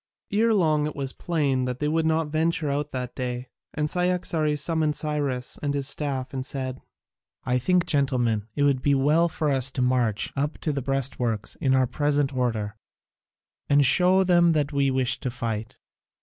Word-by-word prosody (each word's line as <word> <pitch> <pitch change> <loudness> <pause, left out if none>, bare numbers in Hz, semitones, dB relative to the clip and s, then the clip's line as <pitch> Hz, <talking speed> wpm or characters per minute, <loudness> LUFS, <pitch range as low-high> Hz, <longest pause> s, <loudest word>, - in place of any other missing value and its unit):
Ere 225 +3 +3
long 155 -7 +2
it 150 - -6
was 135 -2 -3
plain 140 -7 0
that 125 -1 -3
they 150 - -1
would 160 +1 +1
not 160 -1 +1
venture 160 -1 0
out 145 +1 -2
that 125 -2 -5
day, 125 0 -4 0.3
and 150 0 0
Cyaxares 170 -3 0
summoned 160 -2 0
Cyrus 145 -5 -2
and 145 -1 -1
his 140 -1 -1
staff 135 -2 -3
and 130 -1 -3
said: 130 -1 -3 0.6
"I 125 0 0
think, 180 +6 +2
gentlemen, 120 -7 0
it 145 - +1
would 140 -3 +2
be 140 0 +2
well 150 +5 +3
for 155 -2 -1
us 135 -1 +1
to - - -1
march 125 -4 0
up 145 +2 -2
to 155 - -1
the 140 - -2
breastworks 125 -5 -1
in 130 -1 +3
our 130 -1 +3
present 145 +1 0
order, 110 -4 -2 0.9
and 145 0 +5
show 180 +7 +5
them 175 -2 +4
that 150 -1 0
we 140 -1 +2
wish 130 -2 0
to 130 - -3
fight. 115 -3 -4
140 Hz, 180 wpm, -25 LUFS, 130-155 Hz, 0.9 s, and